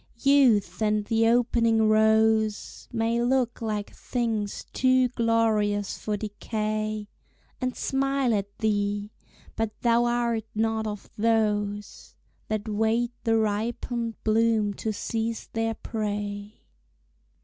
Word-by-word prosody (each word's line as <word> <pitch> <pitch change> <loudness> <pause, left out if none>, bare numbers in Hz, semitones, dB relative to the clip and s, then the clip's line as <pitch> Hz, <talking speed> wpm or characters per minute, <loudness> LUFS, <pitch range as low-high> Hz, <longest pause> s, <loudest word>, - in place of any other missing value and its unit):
Youth 235 -10 +4
and 210 -1 +1
the 225 +1 +2
opening 230 -2 +3
rose 220 0 +2
May 230 0 0
look 245 -1 +1
like 210 -2 -3
things 225 -5 -3
too 255 -1 +3
glorious 220 -4 +1
for 210 -1 -2
decay, 215 0 -3 0.5
And 255 0 -1
smile 270 -2 +1
at 200 -1 0
thee 205 -1 -1 0.4
but 225 -1 -3
thou 235 0 +3
art 235 -2 0
not 220 0 0
of 210 -1 -7
those 210 -2 -1 0.3
That 215 0 -3
wait 220 +3 +1
the 225 -1 +3
ripened 230 +2 -1
bloom 220 -1 +2
to 220 - -3
seize 225 +2 -3
their 225 0 -1
prey. 205 -1 -4
220 Hz, 110 wpm, -26 LUFS, 210-230 Hz, 0.5 s, Youth